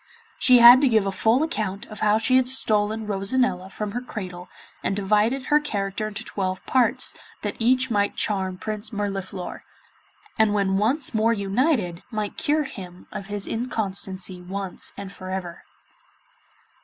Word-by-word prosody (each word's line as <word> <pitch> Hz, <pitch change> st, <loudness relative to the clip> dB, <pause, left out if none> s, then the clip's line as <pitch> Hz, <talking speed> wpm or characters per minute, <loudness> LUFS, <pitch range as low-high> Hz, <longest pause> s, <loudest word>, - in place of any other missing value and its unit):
She 255 Hz, -1 st, +6 dB
had 240 Hz, +2 st, +9 dB
to 275 Hz, -, +4 dB
give 220 Hz, -4 st, +3 dB
a 195 Hz, -, -1 dB
full 225 Hz, +8 st, +2 dB
account 210 Hz, -, -3 dB
of 215 Hz, -, -10 dB
how 210 Hz, 0 st, +3 dB
she 255 Hz, +3 st, +3 dB
had 260 Hz, -1 st, +2 dB
stolen 220 Hz, -4 st, +1 dB
Rosanella 195 Hz, -1 st, 0 dB
from 210 Hz, +1 st, -5 dB
her 245 Hz, +4 st, -3 dB
cradle, 185 Hz, -7 st, -7 dB, 0.3 s
and 195 Hz, -, -1 dB
divided 210 Hz, +6 st, +1 dB
her 295 Hz, +1 st, +4 dB
character 205 Hz, -7 st, -3 dB
into 215 Hz, +1 st, -6 dB
twelve 185 Hz, -3 st, -4 dB
parts, 255 Hz, -2 st, +3 dB, 0.3 s
that -, -, -3 dB
each 255 Hz, +2 st, +2 dB
might 205 Hz, -2 st, +1 dB
charm 190 Hz, -3 st, -1 dB
Prince 215 Hz, +3 st, -3 dB
Mirliflor, 195 Hz, -3 st, -4 dB, 0.8 s
and 215 Hz, -1 st, +3 dB
when 195 Hz, -1 st, +1 dB
once 255 Hz, +7 st, +2 dB
more 225 Hz, +1 st, +2 dB
united 200 Hz, -, 0 dB
might 215 Hz, -3 st, -4 dB
cure 300 Hz, +1 st, +1 dB
him 185 Hz, -9 st, -10 dB
of 195 Hz, -, -7 dB
his 205 Hz, -1 st, -3 dB
inconstancy 195 Hz, -5 st, -3 dB
once 190 Hz, +1 st, -5 dB
and 200 Hz, -1 st, -7 dB
for 185 Hz, -1 st, -9 dB
ever. 185 Hz, -2 st, -6 dB
210 Hz, 155 wpm, -24 LUFS, 195-235 Hz, 0.8 s, had